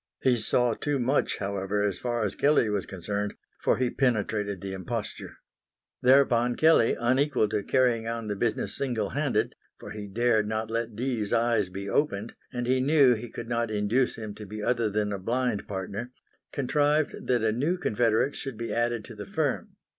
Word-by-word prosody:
He 125 Hz, -2 st, +4 dB
saw 120 Hz, +2 st, +2 dB
too 145 Hz, +5 st, -1 dB
much, 130 Hz, +3 st, +1 dB
however, 100 Hz, 0 st, -1 dB
as 95 Hz, -3 st, -3 dB
far 120 Hz, -2 st, -1 dB
as 100 Hz, -, -1 dB
Kelley 140 Hz, -7 st, +3 dB
was 100 Hz, -2 st, -1 dB
concerned, 100 Hz, +2 st, -3 dB, 0.3 s
for -, -, +2 dB
he 125 Hz, -1 st, 0 dB
penetrated 105 Hz, -5 st, 0 dB
the 95 Hz, +1 st, -5 dB
imposture. 105 Hz, +4 st, -5 dB, 0.6 s
Thereupon 125 Hz, -2 st, +4 dB
Kelley, 160 Hz, -7 st, +4 dB
unequal 130 Hz, 0 st, +2 dB
to 105 Hz, -, 0 dB
carrying 115 Hz, 0 st, +2 dB
on 115 Hz, -1 st, -3 dB
the 105 Hz, -, -2 dB
business 110 Hz, +2 st, -1 dB
single 115 Hz, -7 st, -1 dB
handed, -, -, 0 dB, 0.3 s
for -, -, -9 dB
he 105 Hz, -1 st, -6 dB
dared 110 Hz, +1 st, +2 dB
not 110 Hz, +1 st, -2 dB
let 115 Hz, -1 st, -2 dB
Dee's 115 Hz, -3 st, -1 dB
eyes 115 Hz, -4 st, +2 dB
be 95 Hz, +2 st, -6 dB
opened 110 Hz, -3 st, 0 dB, 0.2 s
and 125 Hz, -2 st, -3 dB
he 130 Hz, +1 st, +2 dB
knew 140 Hz, -1 st, +5 dB
he 120 Hz, +1 st, -5 dB
could 115 Hz, +1 st, -7 dB
not 115 Hz, -1 st, 0 dB
induce 110 Hz, +5 st, +1 dB
him 110 Hz, -2 st, -6 dB
to 105 Hz, +1 st, -9 dB
be 105 Hz, +1 st, -6 dB
other 120 Hz, -2 st, +1 dB
than 105 Hz, 0 st, -1 dB
a 100 Hz, -, -3 dB
blind 120 Hz, +1 st, -1 dB
partner, 100 Hz, +5 st, -5 dB, 0.4 s
contrived 145 Hz, +2 st, 0 dB
that 120 Hz, -3 st, +2 dB
a 110 Hz, -, +3 dB
new 145 Hz, +11 st, 0 dB
confederate 120 Hz, -2 st, +1 dB
should 135 Hz, -5 st, -6 dB
be 115 Hz, 0 st, -4 dB
added 120 Hz, -2 st, 0 dB
to -, -, -10 dB
the 105 Hz, -2 st, -8 dB
firm. -, -, -2 dB
115 Hz, 185 wpm, -27 LUFS, 105-125 Hz, 0.6 s, knew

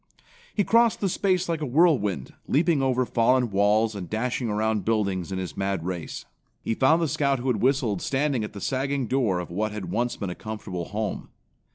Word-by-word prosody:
He 205 Hz, -, +3 dB
crossed 230 Hz, +2 st, +3 dB
the 200 Hz, -, 0 dB
space 185 Hz, 0 st, +1 dB
like 165 Hz, -2 st, -2 dB
a -, -, -1 dB
whirlwind, 125 Hz, -, +2 dB
leaping 155 Hz, 0 st, +2 dB
over 130 Hz, -1 st, +1 dB
fallen 120 Hz, 0 st, +2 dB
walls 105 Hz, +3 st, +3 dB
and 95 Hz, -4 st, -6 dB
dashing 120 Hz, +2 st, -1 dB
around 105 Hz, -1 st, 0 dB
buildings 100 Hz, -5 st, 0 dB
in 95 Hz, -, -2 dB
his 95 Hz, -1 st, -5 dB
mad 95 Hz, -3 st, -2 dB
race. 90 Hz, -3 st, -5 dB, 0.4 s
He -, -, 0 dB
found 155 Hz, +8 st, +3 dB
the -, -, +1 dB
Scout 140 Hz, 0 st, +1 dB
who 130 Hz, +1 st, -2 dB
had 110 Hz, -5 st, 0 dB
whistled 125 Hz, -7 st, +1 dB
standing 135 Hz, -3 st, 0 dB
at 105 Hz, -, -6 dB
the 100 Hz, -, -8 dB
sagging 135 Hz, 0 st, -1 dB
door 115 Hz, -6 st, +1 dB
of 90 Hz, -1 st, -5 dB
what 105 Hz, +4 st, -1 dB
had 105 Hz, -3 st, -6 dB
once 120 Hz, +2 st, 0 dB
been 100 Hz, -4 st, -4 dB
a -, -, -3 dB
comfortable 100 Hz, -4 st, -6 dB
home. 105 Hz, +1 st, -4 dB
115 Hz, 200 wpm, -25 LUFS, 100-135 Hz, 0.4 s, He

